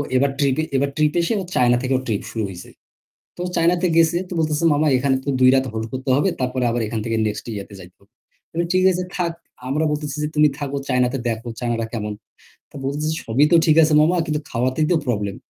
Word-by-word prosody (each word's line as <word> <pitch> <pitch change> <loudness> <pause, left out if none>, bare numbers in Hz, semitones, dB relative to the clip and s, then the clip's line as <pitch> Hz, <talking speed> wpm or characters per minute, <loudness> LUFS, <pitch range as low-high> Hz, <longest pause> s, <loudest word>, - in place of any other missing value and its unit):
এবার 135 +2 +3
ট্রিপে 140 +1 +1
এবার 140 +1 +1
ট্রিপ 150 -1 +2
এসে 170 - 0
ও - - -5
চায়না 120 -1 +4
থেকে 130 +1 -1
ওর 130 - -5
ট্রিপ 105 -4 -1
শুরু 110 - -3
হইছে। 90 -2 -10 0.7
তো - - -20
ও - - -2
চায়নাতে 175 +2 +2
গেছে 165 0 +4
তো - - -5
বলতেছে, 155 0 0
"মামা 150 +1 +2
এখানে 135 +1 +1
তো - - -2
২ 130 0 +6
রাত 135 0 +2
হোল্ড 110 0 -3
করতে 130 +1 -4
হবে 150 +8 +2
তারপরে 130 0 -1
আবার 120 0 -1
এখান 110 +1 -3
থেকে 115 -1 -1
নেক্সট 105 - -5
ইয়াতে 100 0 -7
যাইতে 90 -1 -14
হবে। 100 +2 -27 0.4
আমি 170 +1 0
"ঠিক 185 0 +3
আছে 180 0 -2
থাক।" 170 -2 -1 0.4
আমরা 150 +4 0
বলতেছি 150 -1 -3
যে, - - 0
"তুমি 150 0 +5
থাকো 140 -1 -3
চায়নাতে 125 0 +1
দেখও 115 +1 -3
চায়নারা 120 -2 -1
কেমন?" 105 -2 -3 0.6
তো - - -17
বলতেছে, 145 +3 -2 0.2
"সবই 125 +6 +3
তো - - +6
ঠিক 155 - +4
আছে 155 0 +2
মামা 165 +4 +3
কিন্তু 150 -1 -1
খাওয়াতেই 130 +5 0
তো - - +4
প্রবলেম।" 100 -4 -1
135 Hz, 225 wpm, -21 LUFS, 120-155 Hz, 0.7 s, ২